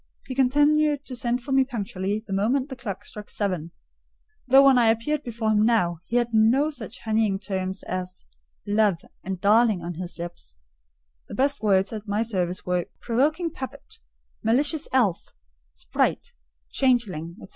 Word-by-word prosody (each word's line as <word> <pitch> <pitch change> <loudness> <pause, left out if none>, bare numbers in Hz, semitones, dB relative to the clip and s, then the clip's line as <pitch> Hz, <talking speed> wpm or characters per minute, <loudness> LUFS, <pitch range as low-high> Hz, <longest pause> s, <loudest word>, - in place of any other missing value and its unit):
He 260 - -5
continued 290 +2 +3
to 255 - -7
send 245 0 -1
for 270 - -6
me 270 0 +5
punctually 210 -4 -3
the 195 - -5
moment 250 +8 +1
the 265 - -6
clock 205 -5 -6
struck 210 -1 -9
seven; 180 -6 -2 0.8
though 270 +2 +7
when 265 -2 +6
I 235 - +4
appeared 230 +7 +1
before 230 -4 -2
him 210 0 +3
now, 180 -8 +2
he 235 - -3
had 240 -1 +1
no 240 +8 +4
such 230 -5 -8
honeyed 215 -3 +1
terms 190 -1 -3
as 185 0 -5 0.4
"love" 205 -3 +2 0.3
and 190 -1 -4
"darling" 210 -2 +3
on 175 +1 -4
his 175 -1 -6
lips: 170 - -7 0.7
the - - -7
best 280 +2 +1
words 195 0 +2
at 215 0 -6
my 205 +2 0
service 185 -4 -2
were 180 -1 0
"provoking 310 +8 0
puppet," 280 - -9 0.4
"malicious 285 +7 +1
elf," 225 -10 +1 0.4
"sprite," - - -1 0.4
"changeling," 200 - 0
&c. - - -10
225 Hz, 160 wpm, -25 LUFS, 195-260 Hz, 0.8 s, though